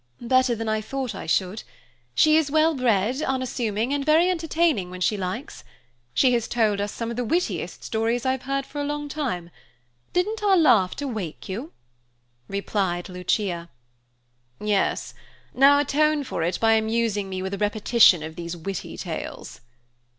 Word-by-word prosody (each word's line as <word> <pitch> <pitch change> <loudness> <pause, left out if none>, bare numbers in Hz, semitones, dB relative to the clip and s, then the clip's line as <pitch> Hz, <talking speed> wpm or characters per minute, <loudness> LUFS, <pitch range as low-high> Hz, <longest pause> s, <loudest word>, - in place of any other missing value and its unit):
"Better 255 0 +2
than 225 0 -4
I 215 0 0
thought 260 +2 -4
I - - -7
should. 185 +5 0 0.5
She 310 0 +5
is 315 -2 +3
well 315 +2 +3
bred, 245 0 +1
unassuming, 250 -3 -1
and 285 -1 0
very 320 +5 +4
entertaining 325 - 0
when 185 0 -8
she 185 +4 +1
likes. 195 +7 -5 0.5
She 255 - +3
has 235 -2 0
told 215 -4 +1
us 205 0 -2
some 230 0 -4
of 235 - -6
the 245 - 0
wittiest 340 +10 -2
stories 230 +3 -1
I've 260 0 0
heard 275 +1 -2
for 290 +1 -5
a - - -1
long 295 0 -3
time. 235 - -3 0.6
Didn't 425 +5 0
our 400 -2 +4
laughter 255 - +3
wake 205 - -5
you?" 235 - -5 0.8
replied 195 -2 -2
Lucia. 180 -1 -2 0.9
"Yes. 210 -2 0 0.4
Now 275 +2 +6
atone 295 +1 +2
for 215 - -4
it 170 +3 -1
by 225 0 +4
amusing 220 -2 0
me 185 0 -4
with 190 +1 -4
a 200 - -4
repetition 210 -4 +4
of 160 0 -7
these 170 0 -6
witty 190 +4 -6
tales." - - -6
230 Hz, 160 wpm, -24 LUFS, 195-280 Hz, 0.9 s, Now